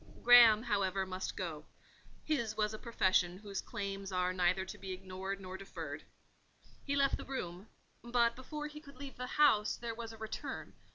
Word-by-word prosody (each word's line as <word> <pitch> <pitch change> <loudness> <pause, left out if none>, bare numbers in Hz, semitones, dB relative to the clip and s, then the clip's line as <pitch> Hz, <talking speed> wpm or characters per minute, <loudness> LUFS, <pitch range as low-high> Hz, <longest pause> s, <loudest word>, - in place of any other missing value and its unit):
Graham, 235 -2 +9
however, 195 -4 0
must 185 0 -4
go: 160 -5 -4 0.6
his 235 -9 -1
was 210 0 +1
a 215 - -6
profession 185 -6 +2
whose 200 -1 -5
claims 195 -3 -5
are 180 0 +1
neither 185 +1 +2
to 190 - -8
be 190 -1 -5
ignored 190 +1 -5
nor 190 0 -7
deferred. 195 - -7 0.8
He 280 - -1
left 275 -1 +3
the - - -7
room; 190 -7 -5 0.4
but 235 -1 +2
before 295 +4 -6
he 300 0 -7
could 280 -4 -14
leave 275 -1 -8
the 250 0 -4
house 245 -9 +5
there 235 -1 -4
was 230 0 -6
a 225 - -11
return. 220 0 -5
210 Hz, 175 wpm, -34 LUFS, 190-245 Hz, 0.8 s, Graham